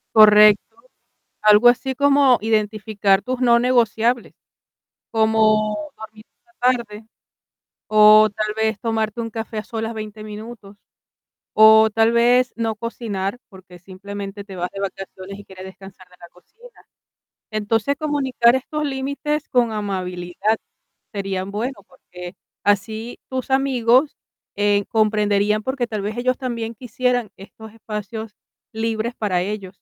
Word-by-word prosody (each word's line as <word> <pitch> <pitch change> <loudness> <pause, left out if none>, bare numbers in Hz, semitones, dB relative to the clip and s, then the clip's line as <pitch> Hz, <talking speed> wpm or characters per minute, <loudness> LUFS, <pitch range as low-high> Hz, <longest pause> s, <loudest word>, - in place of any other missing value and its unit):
Correcto. 210 - +6 0.6
Algo 210 +3 +6
así, 255 +2 +1
como 280 -2 +4
identificar 210 -2 0
tus 255 0 -4
no 235 -2 +4
negociables, 240 -1 +1 0.8
como 220 -1 +2 0.2
dormir 215 0 -12 0.2
por 335 -8 0
la 240 -2 -4
tarde, 210 0 -12 0.8
o 215 0 +7
tal 215 0 -3
vez, 220 -1 -1
tomarte 225 0 -2
un 230 0 -4
café 225 0 -6
a 210 - -5
solas, 225 -1 -4
20 215 -1 -8
minutos. 215 -1 -10 0.8
O 220 0 +7
tal 225 +1 +2
vez, 245 +2 +3
no 225 -1 -2
cocinar, 215 -2 -4
porque 185 -3 -15
simplemente, 200 +2 -8
te 195 -2 -10
vas 180 0 -3
de 195 - -7
vacaciones, 195 0 -7
y 205 - -12
quieres 190 -1 -12
descansar 190 0 -13
de 180 - -21
la 175 - -13
cocina. 460 - -20 0.7
Entonces, 215 +5 0
comunicar 265 -5 +2
estos 300 +4 -3
límites, 280 +2 -3
con 240 -2 +2
amabilidad, 190 0 -2 0.6
sería 195 -2 -3
bueno, 220 +7 -5
porque 180 0 -12 0.3
así 220 +3 -1
tus 260 0 -5
amigos, 265 0 +2 0.4
eh, 205 0 +2
comprenderían. 210 -1 +1
Porque 260 0 -2
tal 215 -3 -4
vez, 210 +3 -4
ellos 255 +1 0
también, 235 -3 -4
quisieran 245 -1 -2
estos 220 +3 -13
espacios 220 0 -7 0.4
libres, 225 +1 -2
para 195 -6 -1
ellos 200 0 -5
220 Hz, 130 wpm, -21 LUFS, 205-240 Hz, 0.8 s, o